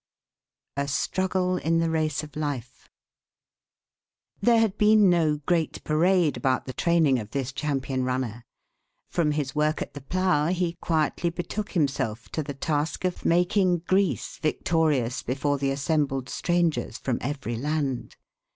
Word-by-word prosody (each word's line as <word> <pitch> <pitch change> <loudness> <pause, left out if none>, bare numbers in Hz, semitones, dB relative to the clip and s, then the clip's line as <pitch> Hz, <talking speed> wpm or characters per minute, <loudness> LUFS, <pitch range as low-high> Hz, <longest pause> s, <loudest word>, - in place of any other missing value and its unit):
A 140 0 0
STRUGGLE 185 +5 0
IN 165 +1 +1
THE 165 0 +1
RACE 155 -2 0
OF 150 - -11
LIFE. 145 -5 -5 1.5
There 235 +2 +5
had 220 -3 +2
been 210 -2 +5
no 160 -3 +2
great 170 -3 0
parade 170 +1 +3
about 130 -2 0
the 130 - -6
training 160 -6 +3
of 105 -2 -7
this 135 0 -3
champion 135 -3 -1
runner. 125 -3 -2 0.7
From 155 -3 +1
his 145 -3 -2
work 155 +1 +1
at - - -5
the 145 - -8
plough 180 0 +1
he 175 -1 0
quietly 165 +1 0
betook 185 +5 -5
himself 135 - -1
to 155 - -2
the 140 -2 -6
task 150 +3 -1
of 180 - -3
making 180 0 +2
Greece 185 - +1
victorious 155 -6 +1
before 140 +3 -1
the 135 0 0
assembled 135 -2 0
strangers 165 -10 0
from 130 -3 -2
every 135 -3 -3
land. 140 0 -2
155 Hz, 140 wpm, -26 LUFS, 135-175 Hz, 1.5 s, There